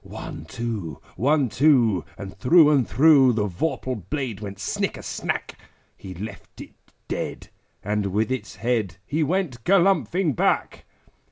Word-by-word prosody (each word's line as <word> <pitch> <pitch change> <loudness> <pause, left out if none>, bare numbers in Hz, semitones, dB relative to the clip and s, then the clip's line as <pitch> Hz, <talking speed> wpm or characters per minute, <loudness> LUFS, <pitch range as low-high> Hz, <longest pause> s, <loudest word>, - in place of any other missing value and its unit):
One, - - -8
two! 105 - -5 0.2
One, 145 +2 +2
two! 120 - +3
And 95 -1 -8
through 150 - +5
and 135 -6 +2
through 135 -1 +5
The 105 -2 0
vorpal 110 - -3
blade 130 -9 -3
went 100 -2 -7
snicker 95 - -3
snack! - - -4 0.4
He 95 -1 -10
left 100 +2 -9
it - - -10 0.3
dead, - - -5 0.3
and 105 0 -1
with 105 +5 -1
its 115 -6 -4
head 110 -7 -1
He 155 +3 -1
went 155 -7 -1
galumphing 190 -4 +2
back. - - 0
120 Hz, 140 wpm, -24 LUFS, 100-150 Hz, 0.4 s, through